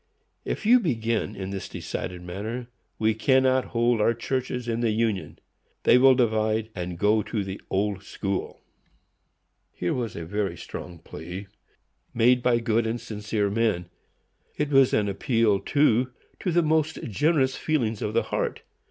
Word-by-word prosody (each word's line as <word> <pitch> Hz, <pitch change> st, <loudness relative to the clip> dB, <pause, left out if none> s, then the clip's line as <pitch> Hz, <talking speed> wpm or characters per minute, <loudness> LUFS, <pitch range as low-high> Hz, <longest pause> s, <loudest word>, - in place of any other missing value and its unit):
If -, -, -3 dB
you 245 Hz, +3 st, +7 dB
begin 115 Hz, -, -1 dB
in 95 Hz, 0 st, -5 dB
this 100 Hz, -1 st, -5 dB
decided 90 Hz, -1 st, -5 dB
manner, 110 Hz, +7 st, -5 dB, 0.3 s
we 110 Hz, 0 st, +2 dB
cannot 130 Hz, +2 st, +3 dB
hold 120 Hz, -1 st, +1 dB
our 115 Hz, +2 st, +3 dB
churches 125 Hz, 0 st, -3 dB
in 115 Hz, 0 st, -1 dB
the 120 Hz, -1 st, +1 dB
union; 110 Hz, -3 st, -1 dB, 0.5 s
they 125 Hz, -, +6 dB
will 130 Hz, 0 st, +7 dB
divide, 110 Hz, -2 st, +1 dB
and 90 Hz, -2 st, -5 dB
go 105 Hz, +4 st, +3 dB
to 105 Hz, -1 st, -3 dB
the 95 Hz, +1 st, -6 dB
Old 100 Hz, 0 st, 0 dB
School." 100 Hz, 0 st, -4 dB, 1.1 s
Here 90 Hz, -, -2 dB
was 120 Hz, -3 st, -3 dB
a 85 Hz, -, -5 dB
very 100 Hz, +3 st, -2 dB
strong 90 Hz, -1 st, -8 dB
plea, 90 Hz, +5 st, -8 dB, 0.7 s
made 120 Hz, +2 st, +4 dB
by 120 Hz, -1 st, +3 dB
good 115 Hz, -1 st, +1 dB
and 115 Hz, +2 st, -2 dB
sincere 105 Hz, -2 st, -2 dB
men. 105 Hz, -6 st, 0 dB, 0.7 s
It 150 Hz, -1 st, 0 dB
was 135 Hz, -2 st, +5 dB
an 105 Hz, -1 st, +2 dB
appeal, 110 Hz, 0 st, +2 dB
too, 130 Hz, -2 st, +2 dB, 0.3 s
to 180 Hz, -, -1 dB
the 170 Hz, +1 st, +3 dB
most 160 Hz, 0 st, +1 dB
generous 130 Hz, -, +1 dB
feelings 120 Hz, -9 st, -1 dB
of 105 Hz, -, -2 dB
the -, -, +3 dB
heart. -, -, -2 dB
115 Hz, 155 wpm, -26 LUFS, 100-125 Hz, 1.1 s, you